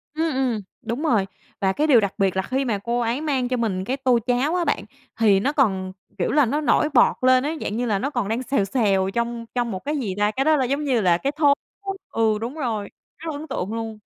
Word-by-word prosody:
Ừm, 320 Hz, -2 st, 0 dB
ừm, 250 Hz, -5 st, 0 dB, 0.2 s
đúng 240 Hz, +7 st, -4 dB
rồi, 220 Hz, -10 st, +2 dB, 0.4 s
và 190 Hz, -1 st, +3 dB
cái 305 Hz, +7 st, +1 dB
điều 250 Hz, -6 st, +7 dB
đặc 200 Hz, -2 st, -1 dB
biệt 195 Hz, -2 st, +1 dB
là 190 Hz, -, +2 dB
khi 265 Hz, +6 st, -1 dB
mà 215 Hz, -4 st, 0 dB
cô 235 Hz, +1 st, -1 dB
ấy 240 Hz, +5 st, -1 dB
mang 270 Hz, -5 st, 0 dB
cho 255 Hz, 0 st, -1 dB
mình 195 Hz, -5 st, -1 dB
cái 265 Hz, +2 st, -2 dB
tô 255 Hz, -3 st, +2 dB
cháo 260 Hz, +7 st, +1 dB
á 350 Hz, -1 st, 0 dB
bạn, -, -, 0 dB, 0.4 s
thì 205 Hz, -4 st, +5 dB
nó 275 Hz, +8 st, +1 dB
còn, 190 Hz, -10 st, +1 dB, 0.3 s
kiểu 175 Hz, -, 0 dB
là, 290 Hz, -2 st, +4 dB
nó 295 Hz, +6 st, -1 dB
nổi 305 Hz, +1 st, +2 dB
bọt -, -, +5 dB
lên 255 Hz, 0 st, +5 dB
ấy, 310 Hz, +2 st, -2 dB
dạng 215 Hz, -, -3 dB
như 245 Hz, -, 0 dB
là 205 Hz, -4 st, 0 dB
nó 275 Hz, -, -1 dB
còn 240 Hz, -8 st, -2 dB
đang 230 Hz, +4 st, -1 dB
xèo 245 Hz, -7 st, +1 dB
xèo 195 Hz, -4 st, +1 dB
trong 235 Hz, 0 st, -2 dB
trong 240 Hz, -2 st, 0 dB
một, 185 Hz, -, -4 dB
cái 295 Hz, +1 st, -1 dB
gì 200 Hz, -8 st, -3 dB
ta, 210 Hz, +1 st, +2 dB
cái 270 Hz, +5 st, -1 dB
đó 310 Hz, 0 st, +5 dB
là, 265 Hz, -3 st, +1 dB
giống 280 Hz, +4 st, -1 dB
như 255 Hz, -6 st, +1 dB
là, 175 Hz, -2 st, +3 dB
cái 275 Hz, +9 st, -1 dB
thố, 290 Hz, -1 st, +4 dB, 0.6 s
ừ, 220 Hz, -2 st, +2 dB
đúng 240 Hz, +4 st, -4 dB
rồi, 225 Hz, -8 st, -3 dB, 0.3 s
rất 325 Hz, 0 st, -6 dB
là 285 Hz, -, -5 dB
ấn 315 Hz, -, -8 dB
tượng 195 Hz, +5 st, -3 dB
luôn. 225 Hz, -1 st, -5 dB
240 Hz, 265 wpm, -23 LUFS, 210-275 Hz, 0.6 s, điều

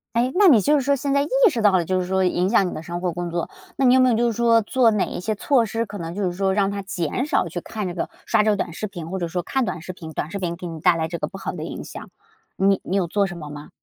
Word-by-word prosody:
哎， 245 Hz, +2 st, +2 dB
那 405 Hz, +1 st, +5 dB
你 260 Hz, -11 st, +7 dB
就 290 Hz, +9 st, +2 dB
是 285 Hz, -, +3 dB
说 280 Hz, +1 st, +2 dB
现 275 Hz, +1 st, -2 dB
在 280 Hz, -, +3 dB
意 290 Hz, -, -1 dB, 0.2 s
识 235 Hz, -, -2 dB
到 205 Hz, -2 st, +5 dB
了 180 Hz, -2 st, +2 dB
就 185 Hz, +2 st, 0 dB
是 180 Hz, -, -4 dB
说 190 Hz, 0 st, +1 dB
影 180 Hz, 0 st, +1 dB
响 195 Hz, -4 st, +3 dB
你 -, -, -5 dB
的 155 Hz, -, -6 dB
生 175 Hz, +1 st, -5 dB
活 180 Hz, -1 st, -2 dB
工 175 Hz, 0 st, -4 dB
作， 170 Hz, 0 st, -2 dB, 0.3 s
那 270 Hz, -, +2 dB
你 250 Hz, -, +6 dB
有 260 Hz, -, +5 dB
没 255 Hz, 0 st, +5 dB
有 230 Hz, -, +3 dB
就 240 Hz, 0 st, +2 dB
是 -, -, -6 dB
说 230 Hz, 0 st, +4 dB
做 235 Hz, +2 st, +3 dB
哪 210 Hz, -3 st, +1 dB
一 -, -, -6 dB
些 210 Hz, +4 st, -2 dB
措 240 Hz, +2 st, +2 dB
施， 230 Hz, +3 st, -2 dB
可 205 Hz, -1 st, -8 dB
能 165 Hz, +1 st, -6 dB
就 205 Hz, -, -2 dB
是 180 Hz, -, 0 dB
说 190 Hz, +1 st, 0 dB
让 200 Hz, 0 st, +1 dB
它 200 Hz, 0 st, -4 dB
减 190 Hz, -, -3 dB
少 245 Hz, -, +1 dB
去 170 Hz, +1 st, -5 dB
看 210 Hz, 0 st, -5 dB
这 175 Hz, -, -4 dB
个 175 Hz, -, -3 dB, 0.2 s
刷 -, -, +3 dB
这 215 Hz, -, +2 dB
个 205 Hz, -, +2 dB
短 170 Hz, -, -3 dB
视 215 Hz, -, -4 dB
频， 175 Hz, -4 st, -8 dB
或 190 Hz, -, -3 dB
者 170 Hz, -, -2 dB
说 175 Hz, +1 st, -3 dB
看 265 Hz, -3 st, 0 dB
短 180 Hz, -3 st, -4 dB
视 185 Hz, +1 st, -7 dB
频 160 Hz, -3 st, -9 dB
短 155 Hz, +1 st, -4 dB
视 200 Hz, -, -4 dB
频 175 Hz, -2 st, -2 dB
给 175 Hz, +1 st, -9 dB
你 165 Hz, -2 st, -6 dB
带 175 Hz, +1 st, +4 dB
来 160 Hz, -1 st, -1 dB
这 170 Hz, +1 st, -5 dB
个 -, -, -2 dB
不 195 Hz, -, -9 dB
好 -, -, -4 dB
的 -, -, -6 dB
影 -, -, -6 dB
响， -, -, -9 dB, 0.5 s
你 195 Hz, 0 st, +2 dB
你 190 Hz, -, -3 dB
有 190 Hz, -, +1 dB
做 200 Hz, +4 st, 0 dB
什 175 Hz, -2 st, -8 dB
么 150 Hz, -2 st, -8 dB
吗？ 150 Hz, 0 st, -9 dB
195 Hz, 365 characters per minute, -22 LUFS, 175-230 Hz, 0.5 s, 你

